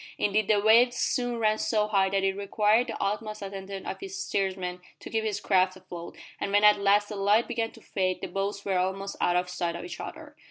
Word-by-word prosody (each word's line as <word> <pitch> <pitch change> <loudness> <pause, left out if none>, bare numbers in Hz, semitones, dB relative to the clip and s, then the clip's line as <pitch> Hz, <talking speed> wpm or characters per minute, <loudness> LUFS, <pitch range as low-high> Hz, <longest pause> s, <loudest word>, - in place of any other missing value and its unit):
Indeed 210 0 +1
the 210 -1 +4
waves 230 +4 +5
soon 245 -1 0
ran 215 -1 +1
so 210 -2 +1
high 195 -2 +2
that 195 0 0
it 195 0 +1
required 210 +4 +2
the - - -5
utmost 210 +1 -3
attention 195 0 -7
of - - -5
each 390 -1 -7
steersman 190 - -2 0.2
to - - -10
keep 220 -1 0
his 210 -2 -2
craft 185 -2 +2
afloat, 175 -2 -9 0.2
and - - -2
when 205 +1 +3
at 210 -1 +6
last 205 +1 +3
the 210 - -5
light 205 +3 +3
began 230 -2 -1
to - - -15
fade 185 -1 -1
the - - -4
boats 200 +1 -3
were 190 -2 +1
almost 195 +2 -2
out 175 - +2
of 180 0 +1
sight 175 -1 -3
of 170 - -6
each 175 -1 -8
other. - - -8
200 Hz, 230 wpm, -27 LUFS, 190-215 Hz, 0.2 s, at